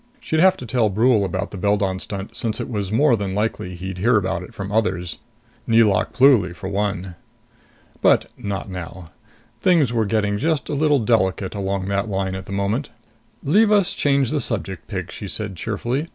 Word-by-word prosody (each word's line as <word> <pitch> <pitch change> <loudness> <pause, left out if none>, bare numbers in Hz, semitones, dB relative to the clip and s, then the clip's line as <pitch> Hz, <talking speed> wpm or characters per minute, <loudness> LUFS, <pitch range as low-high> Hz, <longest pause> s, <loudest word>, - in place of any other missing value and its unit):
She'd 160 -9 -1
have 185 +2 +5
to 125 - -8
tell 115 -2 +1
Brule 110 +2 +3
about 95 +1 -3
the 100 - -7
Beldon 100 -1 0
stunt, 100 +1 -7
since 110 -2 -2
it - - -3
was 100 -3 -3
more 135 +3 +4
than 100 -3 -3
likely 105 -4 -2
he'd 90 +1 -6
hear 115 +4 +4
about 95 -2 -1
it 90 - -10
from 100 0 -6
others 95 -5 -1 0.5
Nelauk 110 -5 +3
Pluly, 120 -10 +4
for 95 0 -6
one. 100 -2 -2 0.9
But - - +4
not 100 -1 -4
now. 90 -2 -8 0.5
Things 160 -10 +3
were 110 -3 +1
getting 105 -1 0
just 160 +3 0
a - - -2
little 145 0 +3
delicate 105 -5 +1
along 100 -2 -2
that 100 +2 -1
line 95 -1 -1
at 95 0 -6
the - - -8
moment. 100 +7 -1 0.5
"Leave 210 +9 +4
us 200 -2 +3
change 140 - +1
the 150 -2 0
subject, 95 -7 -3
pig," - - -5
she - - -7
said 105 -2 -4
cheerfully. 120 - -3
105 Hz, 185 wpm, -21 LUFS, 95-125 Hz, 0.9 s, have